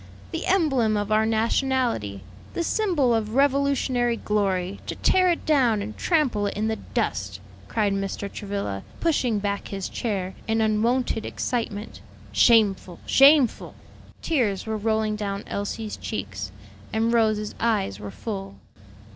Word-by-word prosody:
the 330 - -3
emblem 270 - +2
of 205 +1 -2
our 215 +1 +3
nationality, 225 - 0 0.3
the 340 - 0
symbol 335 - +2
of 220 0 -1
Revolutionary 275 -3 +2
glory; 195 -3 -1
to - - -3
tear 370 -1 +3
it 340 - -1
down 255 -8 +3
and 210 +2 -5
trample 260 - +1
it - - -4
in 215 +1 0
the 220 - 0
dust!" 100 - -3 0.3
cried 210 -3 +1
Mr. 195 +1 -3
Travilla, 200 - -4 0.2
pushing 265 -9 +1
back 200 0 -2
his 195 -2 -4
chair 190 -5 -3
in 225 0 +1
unwonted 225 +2 +1
excitement; 225 -4 -3 0.3
"shameful, 200 -6 +3
shameful!" 275 -2 +5 0.5
Tears 230 - 0
were 220 -1 -2
rolling 220 0 0
down 200 -1 -3
Elsie's 210 +2 -4
cheeks, 100 0 -5 0.4
and 225 +1 +1
Rose's 215 -2 +1
eyes 205 - 0
were 105 0 -6
full. 195 - -6
220 Hz, 135 wpm, -25 LUFS, 200-245 Hz, 0.5 s, shameful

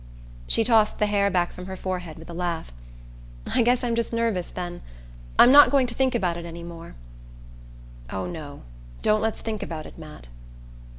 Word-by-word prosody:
She 225 - +3
tossed 220 -2 +3
the 210 - +2
hair 200 -1 +2
back 175 -2 0
from 180 0 -9
her 190 - -5
forehead 180 -4 -5
with 160 - -12
a 170 - -8
laugh. 170 - -3 0.8
"I - - +4
guess 245 +2 +2
I'm 240 -1 0
just 230 0 -1
nervous, 230 -6 -1
then. 175 -1 -6 0.6
I'm 245 - +8
not 290 +1 +9
going 275 -2 +3
to 240 - -2
think 260 0 +1
about 180 -7 0
it 170 - -6
any 170 0 -8
more." 170 0 -10 1.2
"Oh, 95 -1 -3
no 145 - -8 0.4
don't 215 0 +3
let's 220 0 -2
think 220 -2 -4
about 155 -2 -5
it, - - -12
Matt!" 150 - -11
185 Hz, 185 wpm, -25 LUFS, 170-230 Hz, 1.2 s, not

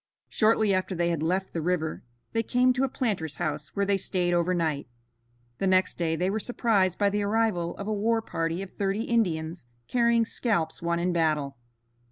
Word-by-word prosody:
Shortly 215 -2 +3
after 185 0 -1
they 170 0 +1
had 165 -3 -1
left 185 +4 -1
the 165 - -2
river 160 -2 -1 0.3
they 225 - +2
came 250 +3 +3
to 255 +1 0
a 270 - +1
planter's 195 - -2
house 150 0 -3
where 200 0 +1
they 200 0 +1
stayed 180 -2 0
over 175 +1 +2
night. 160 -6 -1 0.7
The 195 - +1
next 185 -1 +2
day 165 -2 +1
they 180 +3 0
were 215 - -1
surprised 205 -6 +1
by 200 -1 +2
the 205 +1 0
arrival 205 -5 0
of 200 - -5
a 215 - 0
war 225 +2 +1
party 165 +1 -2
of 195 - -10
thirty 200 +2 -1
Indians 170 - -1 0.2
carrying 235 -1 +3
scalps 175 -9 -1
won 170 0 0
in 175 +1 0
battle. 155 -4 0
185 Hz, 195 wpm, -27 LUFS, 165-215 Hz, 0.7 s, Shortly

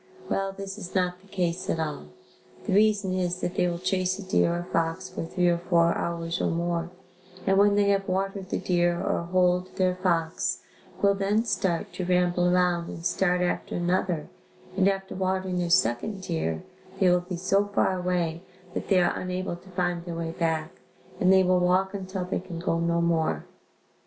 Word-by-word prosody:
Well, 195 0 0
this 195 +1 -7
is 185 -1 -8
not 180 -1 0
the 195 - -21
case 185 -1 -2
at 165 - 0
all. 150 - -3 0.6
The - - 0
reason 205 -2 +3
is 180 -1 -1
that 175 - -2
they 180 - +2
will 170 -1 -2
chase 185 +1 0
a 205 - -7
deer 185 -2 +2
or 175 0 -2
fox 165 +3 0
for 185 - -5
three 175 +2 0
or 170 -1 +2
four 170 -1 +3
hours 170 0 -2
or - - +1
more 170 0 -1 0.6
and 195 - +3
when 205 0 +5
they 205 -1 +3
have 195 -1 +1
watered 195 0 -2
the - - -1
deer 175 -1 +1
or - - 0
holed 180 +1 +1
their 185 -1 +2
fox, 170 -3 -1 0.4
will 200 0 +5
then 200 +3 +1
start 180 -7 -1
to 185 - -4
ramble 180 0 +2
around 180 -1 +2
and 165 - -8
start 180 0 +2
after 180 - -1
another 175 -2 0 0.5
and 190 0 +3
after 195 -1 -3
watering 185 -1 -1
their 175 -1 -1
second 180 - +1
deer, 160 - -2 0.4
they 190 - +4
will 180 0 +5
be 180 0 -5
so 195 +3 +2
far 195 -2 +1
away 175 -2 -1 0.3
that - - -4
they 190 -3 +4
are 175 - +2
unable 185 -1 -3
to 180 +2 -16
find 175 -2 -1
their 170 -2 -5
way 165 -1 -3
back, 160 -1 -2 0.4
and 185 - +4
they 190 0 +6
will 185 0 +3
walk 185 +2 +2
until 190 -1 -4
they 180 - -2
can 180 -2 -8
go 165 0 0
no 170 0 +1
more. 160 - +1
180 Hz, 195 wpm, -27 LUFS, 170-190 Hz, 0.6 s, they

